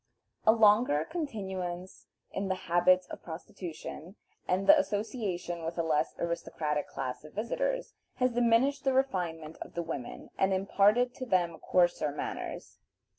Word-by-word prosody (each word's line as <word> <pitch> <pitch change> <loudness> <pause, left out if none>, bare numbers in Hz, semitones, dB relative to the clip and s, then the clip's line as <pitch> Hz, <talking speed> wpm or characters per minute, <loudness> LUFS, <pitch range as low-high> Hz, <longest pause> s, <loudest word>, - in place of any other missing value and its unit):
A - - +10
longer 210 -8 +4
continuance 190 - -5 0.2
in 195 0 -2
the 190 - 0
habits 180 +1 +3
of - - -8
prostitution, 170 +1 -8 0.3
and 185 +2 +1
the 300 - +9
association 205 - -2
with 165 +1 -4
a 170 - +1
less 155 -1 +1
aristocratic 155 -3 -2
class 130 0 -5
of 155 - -12
visitors, - - -1 0.2
has 255 0 +2
diminished 245 +4 +3
the 270 -1 +2
refinement 175 -12 -1
of - - -8
the 170 - -1
women 160 -7 -6
and 190 0 +3
imparted 205 +6 +3
to 255 - -6
them 175 -5 +1
coarser 175 -4 +2
manners. 145 - -6
185 Hz, 140 wpm, -30 LUFS, 170-230 Hz, 0.3 s, A